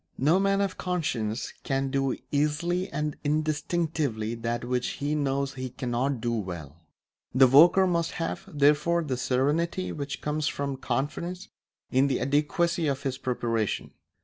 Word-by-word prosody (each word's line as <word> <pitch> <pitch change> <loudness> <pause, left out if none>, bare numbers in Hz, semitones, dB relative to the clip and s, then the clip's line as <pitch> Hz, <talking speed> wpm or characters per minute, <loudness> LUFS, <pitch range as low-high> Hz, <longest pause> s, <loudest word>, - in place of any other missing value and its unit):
No 155 +8 +3
man 195 0 +2
of 195 -2 -2
conscience 125 -11 -2
can 135 0 -1
do 135 -1 0
easily 165 +6 0
and 150 0 -2
instinctively 150 -6 -1
that 120 +1 -3
which 125 0 0
he 145 +1 -2
knows 140 -1 0
he 130 -1 -5
cannot 125 +1 -1
do 120 +1 -1
well. 85 -9 -5 0.6
The 130 0 +8
worker 165 +9 +7
must 170 -2 0
have, 165 - -3
therefore, 150 +4 +3
the 135 -4 -2
serenity 150 +9 0
which 140 -1 -4
comes 150 0 -1
from 140 -1 -2
confidence 170 +8 -3 0.4
in 130 +2 +4
the 135 - 0
adequacy 155 +4 +1
of 140 -1 -1
his 130 -1 -2
preparation. 115 -4 -1
140 Hz, 145 wpm, -27 LUFS, 130-165 Hz, 0.6 s, The